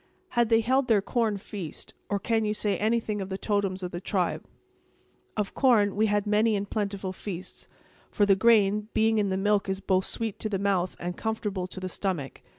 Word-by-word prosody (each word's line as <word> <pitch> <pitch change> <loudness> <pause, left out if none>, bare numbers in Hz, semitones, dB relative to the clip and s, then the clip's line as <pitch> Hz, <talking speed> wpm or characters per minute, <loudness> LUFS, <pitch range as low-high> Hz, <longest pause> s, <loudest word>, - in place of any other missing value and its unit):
"Had 235 -2 +2
they 225 0 +5
held 260 +3 +2
their 220 -3 +4
corn 220 0 0
feast—or 195 +1 -6
can 225 +2 0
you 210 0 0
say 205 -1 0
anything 215 -1 0
of 190 - -5
the 190 - -3
totems 195 -3 -1
of 180 - -4
the 175 - -5
tribe?" 185 -3 -1 0.9
"Of 210 -2 -1
corn, 220 -7 +3
we 215 +1 +3
had 205 0 +1
many 210 +1 +3
and 200 0 -2
plentiful 200 -3 -3
feasts; 185 -2 -7 0.4
for 205 - +2
the 200 -1 +5
grain, 210 -1 +4
being 220 0 +3
in 205 -1 +1
the 190 - 0
milk 205 0 +1
is 190 0 -1
both 190 -1 +1
sweet 225 -3 -3
to 215 - -2
the 200 - 0
mouth 190 -2 0
and 175 0 -4
comfortable 210 -4 -2
to 185 - -8
the 185 - -4
stomach. 180 -7 -3
205 Hz, 200 wpm, -27 LUFS, 190-220 Hz, 0.9 s, they